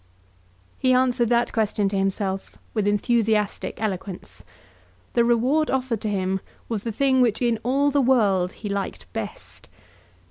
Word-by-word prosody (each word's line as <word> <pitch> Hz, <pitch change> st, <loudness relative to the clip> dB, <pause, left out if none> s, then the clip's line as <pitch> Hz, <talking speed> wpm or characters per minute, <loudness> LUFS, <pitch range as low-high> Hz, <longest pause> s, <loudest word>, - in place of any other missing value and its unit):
He 255 Hz, 0 st, +3 dB
answered 250 Hz, -2 st, +2 dB
that 240 Hz, 0 st, +2 dB
question 210 Hz, -2 st, +1 dB
to 200 Hz, -, -3 dB
himself 195 Hz, 0 st, -2 dB, 0.2 s
with 215 Hz, -3 st, 0 dB
enthusiastic 210 Hz, 0 st, +1 dB
eloquence. 195 Hz, -3 st, -5 dB, 0.7 s
The 235 Hz, -, +4 dB
reward 250 Hz, +7 st, +2 dB
offered 255 Hz, -4 st, -1 dB
to 215 Hz, -, -2 dB
him 190 Hz, -1 st, -1 dB, 0.3 s
was 220 Hz, -3 st, -2 dB
the 230 Hz, -, -3 dB
thing 260 Hz, +3 st, +2 dB
which 230 Hz, -4 st, +2 dB
in 235 Hz, -3 st, +1 dB
all 275 Hz, +4 st, +2 dB
the 285 Hz, 0 st, +3 dB
world 205 Hz, -8 st, +3 dB
he 215 Hz, -, -7 dB
liked 200 Hz, -1 st, -3 dB
best. -, -, -7 dB
225 Hz, 145 wpm, -24 LUFS, 200-250 Hz, 0.7 s, The